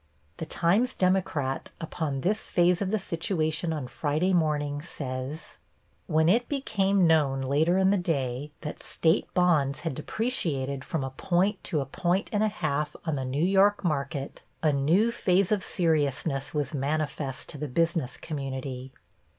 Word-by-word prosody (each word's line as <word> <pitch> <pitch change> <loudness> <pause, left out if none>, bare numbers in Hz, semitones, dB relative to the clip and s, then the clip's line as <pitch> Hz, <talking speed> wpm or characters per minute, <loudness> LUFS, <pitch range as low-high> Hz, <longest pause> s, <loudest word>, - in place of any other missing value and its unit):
The 160 - -5
Times 205 +9 +2
Democrat, 180 -8 0
upon 155 -4 -3
this 210 +7 0
phase 175 +1 +3
of 195 - 0
the 220 - +1
situation 165 -3 -1
on 150 -4 -3
Friday 150 +8 0
morning 150 -4 +1
says: 135 -1 -6 0.5
When 160 +1 +3
it 235 +7 +3
became 200 -9 +2
known 145 -5 +3
later 150 +7 +2
in 190 0 +4
the 205 - +3
day 140 -4 -2
that 150 - -6
State 160 0 +1
bonds 155 -6 +3
had 165 -3 -2
depreciated 145 - -2
from 155 -2 -2
a 135 - -4
point 185 +8 0
to 155 -5 0
a - - -3
point 175 - -1
and 205 - +2
a 215 - +4
half 150 -7 -2
on 160 -3 0
the 135 - -2
New 140 +6 0
York 195 +2 +4
market 140 -3 -2 0.2
a 155 -2 +4
new 165 +12 +3
phase 190 -4 +2
of 210 -3 +2
seriousness 145 -3 0
was 145 -2 -2
manifest 140 -1 -2
to 145 - -7
the 150 - -3
business 165 -1 0
community. 135 -3 -5
155 Hz, 160 wpm, -27 LUFS, 140-180 Hz, 0.5 s, in